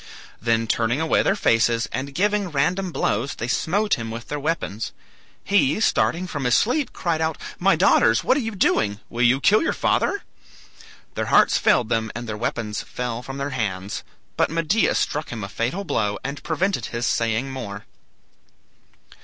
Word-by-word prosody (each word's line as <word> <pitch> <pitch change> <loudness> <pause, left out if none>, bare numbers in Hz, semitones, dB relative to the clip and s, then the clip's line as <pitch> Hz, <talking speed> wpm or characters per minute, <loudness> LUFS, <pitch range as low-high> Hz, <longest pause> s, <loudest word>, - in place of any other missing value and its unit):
Then 115 0 +1
turning 115 +4 0
away 160 0 +2
their 195 - +2
faces, 115 - +2
and 135 +2 -4
giving 205 +1 +1
random 175 +6 0
blows, 125 -2 -1
they 115 - -4
smote 195 - +1
him 115 -1 -5
with 115 +1 -7
their 150 - -3
weapons. 145 -8 -3 0.5
He, 195 -4 +2
starting 185 -4 +1
from 145 -7 -4
his 125 0 +4
sleep, 260 +5 +1
cried 165 -2 -1
out, 160 0 0 0.2
"My - - +4
daughters, - - +4
what 255 - +3
are - - +1
you 225 -2 -4
doing? 105 - +1
Will 120 - -3
you 125 +2 +4
kill 210 +9 +4
your - - 0
father?" 405 - 0 0.9
Their - - -3
hearts - - +4
failed 115 - +3
them 110 -1 0
and 120 0 -5
their 110 - -3
weapons 105 -1 -3
fell 120 -1 -4
from 135 +2 -7
their 140 +1 -3
hands, 100 -6 -3 0.3
but - - +2
Medea 165 +7 +1
struck 150 +1 -1
him 115 -3 -5
a - - -4
fatal 120 - -2
blow, 105 - -1
and 140 +1 -5
prevented 185 +4 -1
his 120 +1 -3
saying 115 +3 0
more. 105 -6 -6
135 Hz, 175 wpm, -23 LUFS, 115-170 Hz, 0.9 s, his